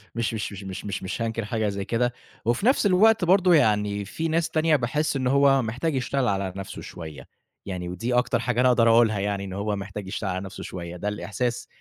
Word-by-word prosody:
مش 115 Hz, -1 st, -1 dB
مش 110 Hz, -1 st, -3 dB
مش 100 Hz, 0 st, -8 dB
مش 95 Hz, +1 st, -7 dB
مش 100 Hz, -, -4 dB
مش 95 Hz, +5 st, -4 dB
هانكر 115 Hz, -1 st, -2 dB
حاجة 110 Hz, 0 st, -1 dB
زي 100 Hz, -1 st, -4 dB
كده 120 Hz, +2 st, 0 dB, 0.3 s
وفي 120 Hz, -, 0 dB
نَفْس 255 Hz, -3 st, +3 dB
الوقت 205 Hz, +1 st, +5 dB
برضه 185 Hz, 0 st, +5 dB
يعني 105 Hz, -7 st, +2 dB
في 160 Hz, +10 st, -3 dB
ناس 165 Hz, +1 st, 0 dB
تانية 155 Hz, 0 st, +2 dB
باحِس 150 Hz, +4 st, 0 dB
إن 130 Hz, -2 st, 0 dB
هو 140 Hz, 0 st, +4 dB
محتاج 130 Hz, +7 st, -2 dB
يشتغل 130 Hz, 0 st, 0 dB
على 95 Hz, -2 st, -1 dB
نَفْسه 95 Hz, 0 st, -7 dB
شوية، 80 Hz, -6 st, -9 dB, 0.4 s
يعني 90 Hz, -2 st, -4 dB
ودي 115 Hz, +8 st, -3 dB
أكتر 125 Hz, -1 st, +2 dB
حاجة 120 Hz, +1 st, 0 dB
أنا 130 Hz, -, +5 dB
أقدر 115 Hz, -2 st, +4 dB
أقولها 115 Hz, -2 st, +4 dB
يعني 100 Hz, 0 st, -2 dB
إن 95 Hz, -, -7 dB
هو 105 Hz, +1 st, -2 dB
محتاج 100 Hz, 0 st, -6 dB
يشتغل 95 Hz, +1 st, -3 dB
على 95 Hz, +1 st, -3 dB
نَفْسه 95 Hz, -, -8 dB
شوية، 85 Hz, -1 st, -7 dB
ده 100 Hz, -, -4 dB
الإحساس 110 Hz, +5 st, -3 dB
115 Hz, 220 wpm, -25 LUFS, 100-130 Hz, 0.4 s, الوقت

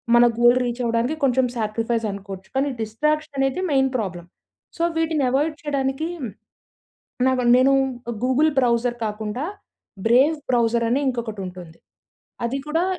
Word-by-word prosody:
మన 240 Hz, 0 st, +7 dB
goal 240 Hz, +1 st, +6 dB
reach 240 Hz, 0 st, -3 dB
అవ్వడానికి 235 Hz, +5 st, 0 dB
కొంచెం 260 Hz, -1 st, +3 dB
సాక్రిఫైస్ 225 Hz, +1 st, -1 dB
అనుకోవచ్చు. 195 Hz, -1 st, -8 dB
కానీ 275 Hz, +2 st, +1 dB
డిస్ట్రాక్షన్ 300 Hz, +7 st, -1 dB
అనేది 270 Hz, +5 st, +1 dB
మెయిన్ 265 Hz, -1 st, +3 dB
ప్రాబ్లమ్. 180 Hz, -6 st, -5 dB, 0.5 s
సో 335 Hz, -, -1 dB
వీటిని 320 Hz, -3 st, +1 dB
అవాయిడ్ 300 Hz, +4 st, +1 dB
చేయడానికి 280 Hz, 0 st, -1 dB, 1.2 s
నాకు 260 Hz, -1 st, +1 dB
నేను 260 Hz, +2 st, +4 dB, 0.5 s
గూగుల్ 270 Hz, +5 st, +3 dB
బ్రౌజర్ 240 Hz, -1 st, +2 dB
కాకుండా 215 Hz, +4 st, -3 dB, 0.6 s
బ్రేవ్ 265 Hz, +7 st, +5 dB
బ్రౌజర్ 235 Hz, -1 st, +2 dB
అని 260 Hz, +4 st, +2 dB
ఇంకొకటి 235 Hz, -5 st, -3 dB
ఉంటుంది. 175 Hz, -2 st, -10 dB, 0.7 s
అది 265 Hz, +4 st, -2 dB
కూడా 325 Hz, +3 st, +1 dB
245 Hz, 130 wpm, -22 LUFS, 225-275 Hz, 1.2 s, మన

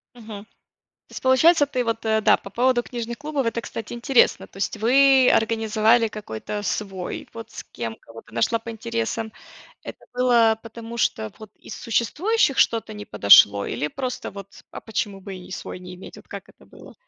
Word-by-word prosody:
Мгм. 215 Hz, -4 st, -10 dB, 0.6 s
То -, -, -20 dB
есть -, -, -8 dB
получается, 290 Hz, +4 st, +5 dB
ты 255 Hz, -3 st, -2 dB
вот, 230 Hz, 0 st, -3 dB
э, 220 Hz, 0 st, +2 dB
да, -, -, +5 dB
по -, -, -11 dB
поводу 245 Hz, +3 st, +2 dB
книжных 235 Hz, -1 st, -6 dB
клубов, 290 Hz, -4 st, -3 dB
это, 230 Hz, +1 st, -1 dB
кстати, 225 Hz, -1 st, -7 dB
интересно. 240 Hz, +2 st, +2 dB
То -, -, -21 dB
есть 195 Hz, +2 st, -3 dB
вы 265 Hz, +3 st, +5 dB
организовали 225 Hz, +1 st, +2 dB
какой-то 205 Hz, -, -6 dB
свой, 195 Hz, -2 st, -4 dB
вот 230 Hz, 0 st, -9 dB
с -, -, -8 dB
кем, 115 Hz, -2 st, -7 dB
кого 115 Hz, 0 st, -13 dB
ты 115 Hz, -, -22 dB
нашла 225 Hz, -, +1 dB
по 230 Hz, +1 st, -8 dB
интересам. 230 Hz, 0 st, -3 dB, 0.5 s
Это -, -, -9 dB, 0.2 s
было 235 Hz, -3 st, +3 dB
потому, 230 Hz, +1 st, -9 dB
что 110 Hz, -, -1 dB
вот 215 Hz, -1 st, -11 dB
из -, -, -10 dB
существующих 275 Hz, -, 0 dB
что-то 225 Hz, -1 st, +1 dB
не 210 Hz, 0 st, -8 dB
подошло, 100 Hz, -, +6 dB
или 150 Hz, -, -3 dB
просто 255 Hz, -, -5 dB
вот 200 Hz, 0 st, -12 dB
"а -, -, -8 dB
почему 205 Hz, -3 st, -4 dB
бы 195 Hz, 0 st, -8 dB
и 180 Hz, -, -12 dB
свой 185 Hz, -, -7 dB
не 180 Hz, 0 st, -10 dB
иметь"? 180 Hz, -, -12 dB
Вот -, -, -15 dB
как -, -, -9 dB
это -, -, -20 dB
было? -, -, -15 dB
225 Hz, 185 wpm, -23 LUFS, 205-245 Hz, 0.6 s, подошло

